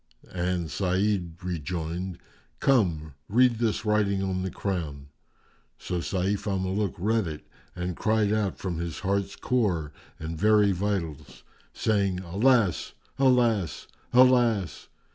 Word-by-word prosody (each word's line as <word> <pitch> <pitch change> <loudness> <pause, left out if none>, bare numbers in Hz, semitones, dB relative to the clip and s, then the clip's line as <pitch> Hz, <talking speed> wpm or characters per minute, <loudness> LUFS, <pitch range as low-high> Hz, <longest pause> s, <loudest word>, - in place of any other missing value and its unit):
and 90 -3 -1
Sa'id 95 -1 0
rejoined, 85 +1 -4 0.4
"Come, 85 - +2 0.2
read 120 +1 +4
this 115 -1 0
writing 100 -2 +1
on 95 -1 -1
the 95 - -2
crown." 80 -9 -4 0.7
So 90 - -3
Sayf 100 +4 -1
al 100 -1 0
Muluk 95 +1 -1
read 110 +2 +1
it 75 -1 -7 0.3
and 90 0 -3
cried 110 0 +1
out 105 -3 0
from 90 -4 -4
his 85 +3 -4
heart's 100 0 -1
core 90 - 0 0.2
and 80 +1 -5
very 105 -1 +4
vitals, 90 -5 -3 0.3
saying, 100 -4 0
"Alas! 100 - +2 0.3
Alas! 120 - +2 0.3
Alas!" 120 -7 +3
95 Hz, 120 wpm, -27 LUFS, 85-105 Hz, 0.7 s, read